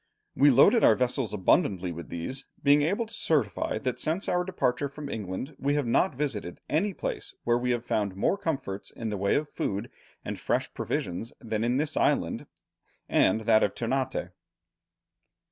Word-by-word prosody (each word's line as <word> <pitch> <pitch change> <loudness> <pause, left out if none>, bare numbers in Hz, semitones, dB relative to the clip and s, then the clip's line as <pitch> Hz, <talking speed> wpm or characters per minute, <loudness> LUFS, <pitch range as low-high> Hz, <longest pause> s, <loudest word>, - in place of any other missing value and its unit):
"We 145 +2 +6
loaded 140 - +6
our 110 - +7
vessels 125 -1 0
abundantly 95 - +2
with 85 0 -8
these, 130 +11 -5 0.2
being 145 +1 +6
able 200 +10 +1
to 225 - -10
certify 130 - 0
that 125 +3 -3
since 165 +6 -1
our 180 0 +1
departure 140 -7 -1
from 145 +1 -8
England 110 - -5
we 140 +1 +1
have 145 -2 0
not 135 +7 +2
visited 120 -11 -3
any 180 +8 +1
place - - -5
where 120 0 +2
we 125 +1 -1
have 120 -1 0
found 100 -3 -1
more 100 - +2
comforts 140 - -3
in 115 - -5
the 105 - -2
way 100 +1 +1
of 150 +1 0
food 100 -7 -3 0.3
and - - -4
fresh - - -1
provisions 90 +7 -3
than 110 -2 -2
in 120 +2 +1
this 150 +1 -1
island - - +1 0.6
and 110 - +3
that 110 0 +4
of 100 - +1
Ternate." 130 -5 -2
125 Hz, 175 wpm, -28 LUFS, 105-150 Hz, 0.6 s, our